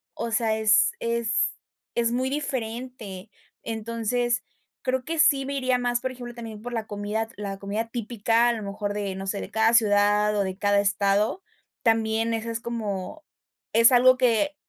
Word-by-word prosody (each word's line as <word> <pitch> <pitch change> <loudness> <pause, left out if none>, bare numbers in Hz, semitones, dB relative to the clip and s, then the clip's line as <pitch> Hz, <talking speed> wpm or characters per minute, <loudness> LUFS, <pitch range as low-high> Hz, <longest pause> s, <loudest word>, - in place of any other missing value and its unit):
o 230 - -4
sea, 225 -1 +1
es 220 - +4
es 235 -1 0 0.4
es 235 -1 +1
muy 255 +2 0
diferente. 240 -7 -5 0.3
Entonces, 230 +1 -1 0.4
creo 255 0 0
que 330 0 -3
sí 285 -4 +4
me 280 - -4
iría 255 -2 +1
más, 245 -1 0
por 260 - -2
ejemplo, 245 -1 -8
también 225 -3 -8
por 245 +2 -6
la 225 -2 -2
comida 210 +2 -3
la 200 -1 -5
comida 210 +3 -3
típica, 230 0 +1
a 240 - +2
lo 220 - -5
mejor 205 +1 -3
de 200 -2 -3
no 195 - -6
sé, 200 +1 -2
de - - -7
cada 220 +1 +3
ciudad, 210 -1 +4
o 200 - +2
de 190 -1 -4
cada 205 0 +2
estado. 200 - +1 0.4
También 225 -1 +2
eso 225 0 -3
es 230 - -3
como 225 +3 -5 0.5
es 230 +2 +7
algo 255 +1 +6
que 255 +4 +2
225 Hz, 175 wpm, -25 LUFS, 210-245 Hz, 0.5 s, es